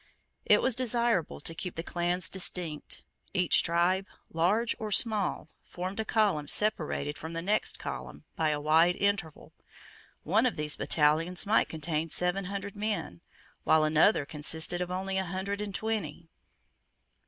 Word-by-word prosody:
It -, -, +5 dB
was 260 Hz, -, +3 dB
desirable 235 Hz, -6 st, +1 dB
to 165 Hz, -, -1 dB
keep 180 Hz, +2 st, -5 dB
the 165 Hz, -, -4 dB
clans 175 Hz, 0 st, 0 dB
distinct. 175 Hz, -4 st, -2 dB, 0.3 s
Each 180 Hz, -2 st, +4 dB
tribe, 180 Hz, +3 st, +1 dB, 0.3 s
large 205 Hz, +8 st, +1 dB
or 215 Hz, -2 st, -4 dB
small, 205 Hz, -6 st, +1 dB
formed 185 Hz, +4 st, -6 dB
a 220 Hz, -, -1 dB
column 200 Hz, -11 st, +1 dB
separated 155 Hz, -8 st, 0 dB
from 160 Hz, +1 st, -7 dB
the 165 Hz, -, -3 dB
next 210 Hz, +3 st, +1 dB
column -, -, -7 dB
by 160 Hz, -1 st, +1 dB
a 150 Hz, -1 st, 0 dB
wide 160 Hz, +4 st, +4 dB
interval. 200 Hz, -6 st, -2 dB, 0.7 s
One 215 Hz, +9 st, +3 dB
of 245 Hz, -, -2 dB
these 150 Hz, -1 st, -1 dB
battalions 160 Hz, +4 st, +1 dB
might 215 Hz, +2 st, +3 dB
contain 160 Hz, 0 st, -2 dB
seven 180 Hz, +4 st, 0 dB
hundred 200 Hz, +1 st, -5 dB
men, 205 Hz, -, -3 dB, 0.4 s
while 160 Hz, -1 st, +4 dB
another 155 Hz, +2 st, +3 dB
consisted 160 Hz, +4 st, -1 dB
of 180 Hz, -, -2 dB
only 190 Hz, +1 st, -2 dB
a 190 Hz, -, -2 dB
hundred 190 Hz, +3 st, -3 dB
and 205 Hz, -2 st, -5 dB
twenty. 190 Hz, -8 st, -3 dB
180 Hz, 150 wpm, -29 LUFS, 160-200 Hz, 0.7 s, It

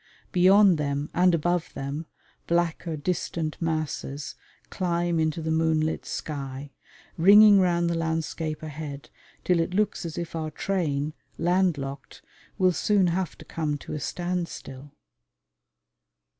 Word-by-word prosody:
Beyond 190 Hz, -1 st, +5 dB
them 145 Hz, 0 st, -2 dB
and 180 Hz, -1 st, +4 dB
above 175 Hz, +1 st, 0 dB
them, 145 Hz, +4 st, -4 dB, 0.4 s
blacker 170 Hz, -1 st, 0 dB
distant 160 Hz, 0 st, -3 dB
masses 155 Hz, -3 st, -3 dB, 0.4 s
climb 175 Hz, -2 st, 0 dB
into 160 Hz, 0 st, 0 dB
the 160 Hz, -, -1 dB
moonlit 160 Hz, -1 st, +1 dB
sky, 140 Hz, -2 st, -5 dB, 0.5 s
ringing 205 Hz, +3 st, +8 dB
round 175 Hz, -2 st, +2 dB
the 170 Hz, -, 0 dB
landscape 160 Hz, -1 st, -2 dB
ahead 150 Hz, -2 st, -7 dB, 0.3 s
till 180 Hz, -2 st, +2 dB
it 170 Hz, +2 st, -1 dB
looks 210 Hz, -1 st, 0 dB
as 165 Hz, -2 st, -6 dB
if 170 Hz, -1 st, -5 dB
our 160 Hz, -1 st, -2 dB
train, 155 Hz, -5 st, -1 dB, 0.2 s
land 180 Hz, -1 st, +2 dB
locked, 135 Hz, 0 st, -7 dB, 0.3 s
will 185 Hz, -2 st, +3 dB
soon 200 Hz, +1 st, +2 dB
have 185 Hz, -3 st, -2 dB
to -, -, -13 dB
come 150 Hz, -3 st, -2 dB
to -, -, -8 dB
a 150 Hz, -, -3 dB
standstill. 170 Hz, -4 st, -4 dB
165 Hz, 130 wpm, -26 LUFS, 150-180 Hz, 0.5 s, ringing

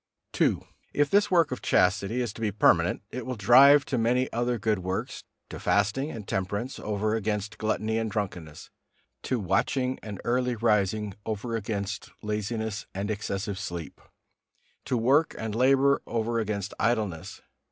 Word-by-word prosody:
II. -, -, +3 dB, 0.3 s
If 145 Hz, -1 st, +2 dB
this 205 Hz, +1 st, +4 dB
work 170 Hz, -6 st, +3 dB
of 125 Hz, -, -4 dB
chastity 100 Hz, +6 st, +2 dB
is 120 Hz, -4 st, -3 dB
to 115 Hz, -, -10 dB
be 110 Hz, -2 st, 0 dB
permanent, 90 Hz, -3 st, +3 dB
it 125 Hz, -, -5 dB
will 130 Hz, +2 st, -4 dB
drive 135 Hz, +7 st, +7 dB
to 130 Hz, -, -1 dB
many 125 Hz, +3 st, +1 dB
other 120 Hz, +1 st, 0 dB
good 105 Hz, -1 st, 0 dB
works, 95 Hz, +1 st, -4 dB, 0.3 s
to -, -, -7 dB
fasting 105 Hz, +8 st, +1 dB
and 110 Hz, -8 st, -8 dB
temperance 100 Hz, +7 st, -3 dB
over 105 Hz, +1 st, -1 dB
against 105 Hz, -1 st, -2 dB
gluttony 110 Hz, +1 st, 0 dB
and 110 Hz, -1 st, -2 dB
drunkenness, 90 Hz, -8 st, -5 dB, 0.5 s
to 130 Hz, -, -1 dB
watching 125 Hz, +6 st, 0 dB
and 105 Hz, -3 st, -7 dB
early 125 Hz, 0 st, +1 dB
rising 105 Hz, -2 st, +1 dB
over 110 Hz, +2 st, -3 dB
against 100 Hz, -1 st, -4 dB
laziness 105 Hz, +1 st, -3 dB
and 100 Hz, +2 st, -2 dB
excessive 100 Hz, -1 st, -3 dB
sleep, 85 Hz, -7 st, -6 dB, 0.8 s
to 125 Hz, -, 0 dB
work 135 Hz, +8 st, +3 dB
and 110 Hz, -1 st, -4 dB
labor 135 Hz, +4 st, +3 dB
over 115 Hz, 0 st, -1 dB
against 105 Hz, -2 st, -3 dB
idleness. 105 Hz, -8 st, -1 dB
110 Hz, 150 wpm, -27 LUFS, 100-125 Hz, 0.8 s, drive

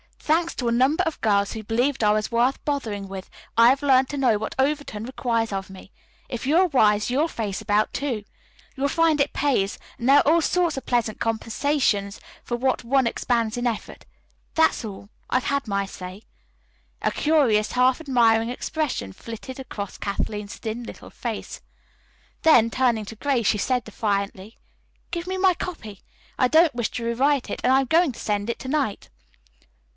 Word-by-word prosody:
Thanks 335 Hz, +2 st, 0 dB
to 245 Hz, -, -2 dB
a -, -, +2 dB
number 260 Hz, +6 st, +3 dB
of 320 Hz, -, -3 dB
girls 200 Hz, -2 st, +2 dB
who 220 Hz, -, -5 dB
believed 240 Hz, +4 st, 0 dB
I 210 Hz, -, +5 dB
was 215 Hz, +2 st, -1 dB
worth 240 Hz, +3 st, +1 dB
bothering 220 Hz, -9 st, -3 dB
with, 190 Hz, -1 st, -8 dB, 0.3 s
I 230 Hz, 0 st, +8 dB
have 275 Hz, +3 st, +1 dB
learned 265 Hz, -2 st, +4 dB
to 290 Hz, -, -4 dB
know 250 Hz, -6 st, +3 dB
what 220 Hz, -, -5 dB
Overton 270 Hz, -5 st, -1 dB
requires 230 Hz, -2 st, -1 dB
of 195 Hz, -1 st, -4 dB
me. 190 Hz, +1 st, -13 dB, 0.4 s
If 245 Hz, +1 st, -5 dB
you 300 Hz, -, +3 dB
are 370 Hz, +1 st, +5 dB
wise, 210 Hz, -8 st, +3 dB
you'll 290 Hz, +6 st, +2 dB
face 215 Hz, -10 st, -4 dB
about, 210 Hz, +1 st, +1 dB
too. 250 Hz, -7 st, -2 dB, 0.5 s
You 270 Hz, -, -9 dB
will -, -, +4 dB
find 325 Hz, -1 st, +2 dB
it 280 Hz, -, +1 dB
pays, 260 Hz, -9 st, 0 dB, 0.2 s
and 235 Hz, -, -2 dB
there 280 Hz, +2 st, +7 dB
are -, -, +1 dB
all 335 Hz, -, +4 dB
sorts 345 Hz, -2 st, +1 dB
of 270 Hz, -, -5 dB
pleasant 235 Hz, -3 st, 0 dB
compensations 225 Hz, -2 st, 0 dB, 0.2 s
for 240 Hz, -, -3 dB
what 255 Hz, +1 st, 0 dB
one 265 Hz, +2 st, +2 dB
expends 230 Hz, -1 st, 0 dB
in 245 Hz, 0 st, 0 dB
effort. 230 Hz, -3 st, -5 dB, 0.5 s
That's 320 Hz, -6 st, +3 dB
all. 200 Hz, -1 st, -9 dB, 0.2 s
I've 255 Hz, -, +1 dB
said 280 Hz, -2 st, -1 dB
my 200 Hz, -1 st, 0 dB
say." 185 Hz, +1 st, -9 dB, 0.8 s
A -, -, +2 dB
curious, 260 Hz, -9 st, +2 dB
half 250 Hz, +1 st, +3 dB
admiring 235 Hz, -6 st, +3 dB
expression 250 Hz, -, -3 dB
flitted 235 Hz, -, -9 dB
across 205 Hz, -6 st, -6 dB
Kathleen's 205 Hz, +1 st, -4 dB
thin 225 Hz, +2 st, -5 dB
little -, -, -10 dB
face. -, -, -6 dB, 0.8 s
Then, 235 Hz, -8 st, +5 dB
turning 235 Hz, -4 st, +1 dB
to 225 Hz, -, -9 dB
Grace, 255 Hz, -3 st, 0 dB
she 210 Hz, -, +2 dB
said 250 Hz, +2 st, 0 dB
defiantly: 200 Hz, -1 st, -3 dB, 0.5 s
"Give 340 Hz, 0 st, -4 dB
me 375 Hz, 0 st, -2 dB
my 375 Hz, -1 st, +4 dB
copy. 230 Hz, -, -7 dB, 0.4 s
I 255 Hz, -, +5 dB
don't 315 Hz, +2 st, +4 dB
wish 240 Hz, -2 st, -1 dB
to 235 Hz, -, -5 dB
rewrite 260 Hz, +3 st, +1 dB
it -, -, -4 dB
and 255 Hz, -, +4 dB
I 265 Hz, +1 st, +5 dB
am -, -, -2 dB
going 325 Hz, -1 st, +3 dB
to -, -, -12 dB
send 205 Hz, 0 st, -2 dB
it 235 Hz, -, -2 dB
to -, -, -8 dB
night." 275 Hz, -8 st, -1 dB
240 Hz, 185 wpm, -24 LUFS, 215-280 Hz, 0.8 s, I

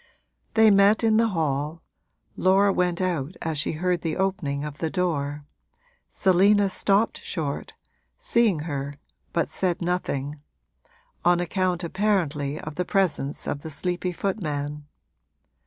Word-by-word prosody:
They 220 Hz, -1 st, +7 dB
met 200 Hz, +3 st, +5 dB
in 220 Hz, -1 st, +4 dB
the 230 Hz, 0 st, +4 dB
hall 155 Hz, -4 st, -2 dB, 0.5 s
Laura 195 Hz, +2 st, +4 dB
went 180 Hz, 0 st, 0 dB
out 175 Hz, -3 st, -1 dB
as 160 Hz, -2 st, -1 dB
she 145 Hz, -, 0 dB
heard 175 Hz, +2 st, 0 dB
the 160 Hz, -2 st, -2 dB
opening 180 Hz, -7 st, -1 dB
of 150 Hz, -1 st, -7 dB
the 160 Hz, -, -1 dB
door, 145 Hz, -6 st, -2 dB, 0.6 s
Selina 195 Hz, +2 st, +4 dB
stopped 200 Hz, +3 st, +1 dB
short, 150 Hz, -6 st, -4 dB, 0.4 s
seeing 220 Hz, -9 st, +2 dB
her, 145 Hz, -2 st, -4 dB, 0.4 s
but 170 Hz, -, 0 dB
said 180 Hz, -2 st, -1 dB
nothing 150 Hz, -5 st, -2 dB, 0.8 s
on 175 Hz, 0 st, +4 dB
account 180 Hz, 0 st, 0 dB
apparently 165 Hz, -7 st, 0 dB
of 155 Hz, -1 st, -8 dB
the 180 Hz, -, +1 dB
presence 180 Hz, -7 st, 0 dB
of 145 Hz, -, -3 dB
the 160 Hz, -, -7 dB
sleepy 180 Hz, +4 st, -2 dB
footman. 150 Hz, -7 st, -3 dB
175 Hz, 130 wpm, -25 LUFS, 150-190 Hz, 0.8 s, They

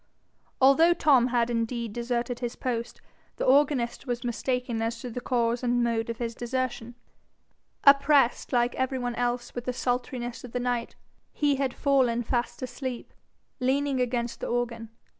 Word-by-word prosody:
Although 295 Hz, +6 st, +6 dB
Tom 265 Hz, -7 st, +4 dB
had 240 Hz, -1 st, +1 dB
indeed 230 Hz, -1 st, -2 dB
deserted 240 Hz, +1 st, -2 dB
his 240 Hz, -1 st, -4 dB
post, 235 Hz, -2 st, -4 dB, 0.3 s
the -, -, -2 dB
organist 265 Hz, -2 st, +2 dB
was 245 Hz, -1 st, -2 dB
mistaken 245 Hz, 0 st, -2 dB
as 230 Hz, +1 st, -2 dB
to 250 Hz, -, -6 dB
the 250 Hz, -, -5 dB
cause 235 Hz, -1 st, 0 dB
and 245 Hz, -1 st, +1 dB
mode 230 Hz, -1 st, 0 dB
of 230 Hz, -, -3 dB
his 235 Hz, -1 st, -3 dB
desertion: 240 Hz, -1 st, -3 dB, 0.9 s
oppressed 280 Hz, -2 st, +5 dB
like 240 Hz, -1 st, +2 dB
every 260 Hz, 0 st, -1 dB
one 245 Hz, -1 st, -2 dB
else 240 Hz, 0 st, -2 dB
with 245 Hz, -1 st, -5 dB
the 250 Hz, -, -1 dB
sultriness 245 Hz, -1 st, -3 dB
of 245 Hz, -, -10 dB
the 250 Hz, -, -1 dB
night, 245 Hz, -1 st, -2 dB, 0.4 s
he 290 Hz, -2 st, +1 dB
had 270 Hz, -2 st, -1 dB
fallen 255 Hz, -4 st, +2 dB
fast 240 Hz, +1 st, -2 dB
asleep, 255 Hz, -1 st, -5 dB, 0.5 s
leaning 270 Hz, +1 st, +1 dB
against 240 Hz, -1 st, -2 dB
the -, -, -4 dB
organ. 235 Hz, -2 st, -2 dB
245 Hz, 160 wpm, -27 LUFS, 235-260 Hz, 0.9 s, Although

